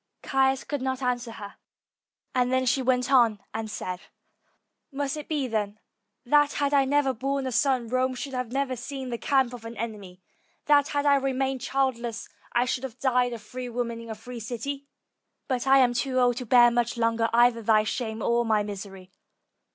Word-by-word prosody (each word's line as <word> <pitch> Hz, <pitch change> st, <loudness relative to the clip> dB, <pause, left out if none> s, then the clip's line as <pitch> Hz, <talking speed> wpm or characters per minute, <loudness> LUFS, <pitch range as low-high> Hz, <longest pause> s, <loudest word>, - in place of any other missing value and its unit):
Caius 270 Hz, -1 st, +2 dB
could 290 Hz, -3 st, -4 dB
not 260 Hz, 0 st, -2 dB
answer 245 Hz, -2 st, -1 dB
her, 205 Hz, -2 st, -9 dB, 0.8 s
and 250 Hz, 0 st, +1 dB
then 260 Hz, 0 st, +2 dB
she 255 Hz, +2 st, +2 dB
went 255 Hz, 0 st, +1 dB
on 235 Hz, -6 st, +4 dB
and 220 Hz, 0 st, -4 dB
said, 180 Hz, -3 st, -5 dB, 0.9 s
"Must 280 Hz, +1 st, -2 dB
it 300 Hz, -1 st, -7 dB
be, 295 Hz, -4 st, 0 dB
then, 210 Hz, -3 st, -2 dB, 0.5 s
that 295 Hz, +3 st, +4 dB
had 285 Hz, 0 st, 0 dB
I 275 Hz, -1 st, +4 dB
never 275 Hz, -1 st, +2 dB
borne 275 Hz, +3 st, -2 dB
a 260 Hz, -, -2 dB
son, 255 Hz, -1 st, +1 dB
Rome 255 Hz, +2 st, 0 dB
should 275 Hz, +1 st, -6 dB
never 255 Hz, +2 st, -2 dB
have 250 Hz, -, -6 dB
seen 265 Hz, 0 st, -6 dB
the 235 Hz, -, -3 dB
camp 265 Hz, -3 st, +2 dB
of 240 Hz, -2 st, -9 dB
an 230 Hz, 0 st, -8 dB
enemy; 205 Hz, -5 st, -6 dB, 0.5 s
that 290 Hz, -1 st, +4 dB
had 290 Hz, -1 st, -1 dB
I 285 Hz, -1 st, +5 dB
remained 270 Hz, -1 st, -1 dB
childless, 240 Hz, -4 st, -1 dB, 0.2 s
I 240 Hz, +1 st, +2 dB
should 250 Hz, +1 st, -2 dB
have 255 Hz, -2 st, -6 dB
died 250 Hz, -1 st, +1 dB
a -, -, -4 dB
free 245 Hz, +4 st, -7 dB
woman 235 Hz, -1 st, -3 dB
in 230 Hz, -, -10 dB
a 220 Hz, -, -4 dB
free 240 Hz, +3 st, -9 dB
city? 270 Hz, +5 st, -5 dB, 0.6 s
But 255 Hz, -1 st, -2 dB
I 270 Hz, 0 st, +7 dB
am 250 Hz, -2 st, +4 dB
too 255 Hz, +2 st, -1 dB
old 245 Hz, -1 st, +3 dB
to 250 Hz, -2 st, -5 dB
bear 240 Hz, 0 st, +6 dB
much 240 Hz, 0 st, 0 dB
longer 230 Hz, 0 st, +1 dB
either 235 Hz, 0 st, +4 dB
thy 215 Hz, -1 st, +4 dB
shame 220 Hz, 0 st, -3 dB
or 235 Hz, 0 st, +2 dB
my 215 Hz, -2 st, +2 dB
misery. 195 Hz, -2 st, -8 dB
250 Hz, 195 wpm, -26 LUFS, 230-270 Hz, 0.9 s, I